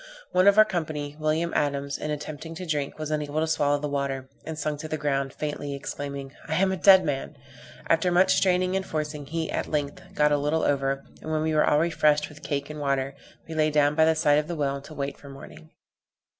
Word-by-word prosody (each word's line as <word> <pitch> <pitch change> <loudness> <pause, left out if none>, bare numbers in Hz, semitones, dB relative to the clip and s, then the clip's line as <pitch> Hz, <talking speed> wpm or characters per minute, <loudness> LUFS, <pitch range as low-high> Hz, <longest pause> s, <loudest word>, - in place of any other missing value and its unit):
One 185 +2 +4
of 200 +1 +6
our 215 - +9
company, 155 -7 -3
William 155 +2 0
Adams, 140 -1 0
in 150 - -4
attempting 150 +2 -5
to 180 +2 -6
drink, 150 -4 -2
was 155 0 -4
unable 150 0 -1
to 160 - +2
swallow 145 -2 +2
the 150 +1 -3
water, 140 -2 -2 0.2
and 160 -1 -6
sunk 150 -1 -2
to 155 - -5
the 155 - -3
ground, 140 -2 -1
faintly 145 -1 -4
exclaiming, 140 -1 -6
"I 160 - -1
am 190 +2 +3
a - - 0
dead 190 0 +7
man!" 140 0 -3 0.5
After 165 +2 +2
much 185 +2 +5
straining 185 0 +2
and 190 - 0
forcing, 150 -4 -4
he, 160 +1 -3
at - - -2
length, 145 -2 -2
got 150 0 +3
a 145 - +4
little 150 +3 0
over; 135 -1 0 0.2
and 155 - -5
when 155 0 0
we 160 0 0
were 155 - +4
all 150 - +4
refreshed 150 -2 +2
with 150 -1 -14
the - - -8
cake 140 -1 -1
and 150 - -7
water, 140 -1 0 0.3
we 165 - -6
lay 155 -1 +2
down 145 -1 +3
by 160 +1 +4
the 160 0 +3
side 150 -2 +4
of 150 - -3
the 170 - -3
well 140 -2 -1
to 155 +2 -12
wait 140 0 -4
for 140 - -12
morning. 75 - -12
150 Hz, 235 wpm, -26 LUFS, 140-160 Hz, 0.5 s, our